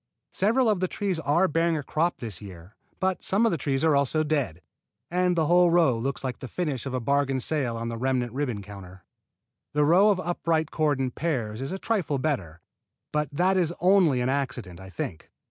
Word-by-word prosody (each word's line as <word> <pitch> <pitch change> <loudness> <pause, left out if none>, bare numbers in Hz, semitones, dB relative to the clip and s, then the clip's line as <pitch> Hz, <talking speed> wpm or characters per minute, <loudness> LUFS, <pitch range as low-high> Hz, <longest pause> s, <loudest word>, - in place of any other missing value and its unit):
Several 230 +6 +2
of 210 -4 +2
the 185 - 0
trees 190 -3 -2
are 165 +5 +2
bearing 165 +1 +1
a 145 - -4
crop 165 +5 0
this 110 -8 -7
year, 95 -1 -12 0.2
but 185 0 0
some 205 +5 +1
of 230 - +3
the 170 - 0
trees 135 0 -1
are 160 -2 +4
also 140 +3 +2
dead, 140 - -2 0.5
and 180 0 +2
the 160 -2 +2
whole 175 +2 +5
row 165 -7 +4
looks 135 +5 -3
like 130 -1 -4
the 130 - -7
finish 140 -3 -3
of 130 - -3
a - - 0
bargain 140 +1 +1
sale 130 -4 -1
on 115 0 -3
the 115 - -4
remnant 125 -2 0
ribbon 125 -7 -2
counter. 95 -2 -11 0.7
The 150 0 +3
row 185 +7 +5
of 200 -3 +2
upright 165 -3 -1
cordon 145 -5 0
pears 125 -9 -2
is 135 - -4
a 190 - -3
trifle 190 -9 -1
better, 95 - -3 0.5
but 150 0 -1
that 185 +6 +2
is 175 -2 +1
only 180 -8 +4
an 125 - 0
accident, 120 -10 -3
I 95 0 -10
think. 85 -2 -6
145 Hz, 205 wpm, -26 LUFS, 125-175 Hz, 0.7 s, whole